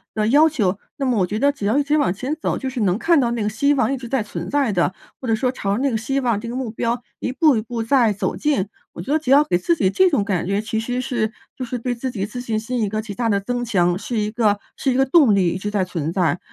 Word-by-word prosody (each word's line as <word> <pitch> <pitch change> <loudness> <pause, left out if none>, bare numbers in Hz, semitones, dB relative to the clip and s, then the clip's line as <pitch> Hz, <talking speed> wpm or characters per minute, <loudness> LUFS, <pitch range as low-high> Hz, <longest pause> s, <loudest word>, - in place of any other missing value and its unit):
的 215 -1 +1
要 295 +7 +6
求， 205 -11 0 0.2
那 275 - -3
么 250 -3 +1
我 185 -3 +2
觉 210 - -3
得 280 +5 +3
只 275 -8 -6
要 220 +6 +2
一 290 - +3
直 295 +2 +1
往 285 -12 +2
前 255 +9 -3
走， - - -1
就 265 - -3
是 260 -1 -5
能 195 -4 +2
看 330 +6 +3
到 240 -3 +1
那 235 -2 -1
个 210 - 0
希 280 +7 +2
望 265 -1 +1
一 - - -2
直 245 -1 -8
在 255 -2 0
存 205 - -6
在 280 -5 +1
的， 180 -1 +1 0.3
或 255 - -6
者 225 - +3
说 250 +2 0
朝 200 -6 -2
着 235 - -2
那 275 -1 +1
个 225 - 0
希 270 +5 -1
望、 235 -5 +1
这 235 - -7
个 235 - -5
目 255 -4 -3
标， 235 +2 -2 0.2
一 255 - -3
步 300 -3 +4
一 - - 0
步 230 +1 -4
在 230 -2 +3
走 195 - -2
近。 245 -11 0 0.2
我 - - -7
觉 280 - -2
得 315 - +3
只 300 - -6
要 280 +2 +7
给 175 -11 0
自 340 - +1
己 190 - +1
这 375 - +4
种 285 - +1
感 195 -4 -1
觉， 200 +1 0
其 220 +1 -2
实 245 +2 -2
是 235 -3 -1 0.2
就 260 - -5
是 250 0 -4
对 245 +1 -2
自 245 +2 -4
己 205 -6 -3
自 245 +4 -6
信 225 -3 -2
心 240 +2 -3
一 210 - 0
个 215 +1 -2
极 215 -2 -6
大 230 +2 -1
地 200 -2 +2
增 245 +4 -3
强， 180 -7 +2
是 230 +3 -4
一 210 0 -1
个 215 -3 +2 0.2
是 270 - 0
一 - - 0
个 265 +1 +3
动 270 -6 +5
力 185 -3 +3
一 175 - -2
直 205 - -3
在 205 -3 0
存 165 -3 -3
在。 175 -2 +1
230 Hz, 340 characters per minute, -21 LUFS, 205-265 Hz, 0.3 s, 要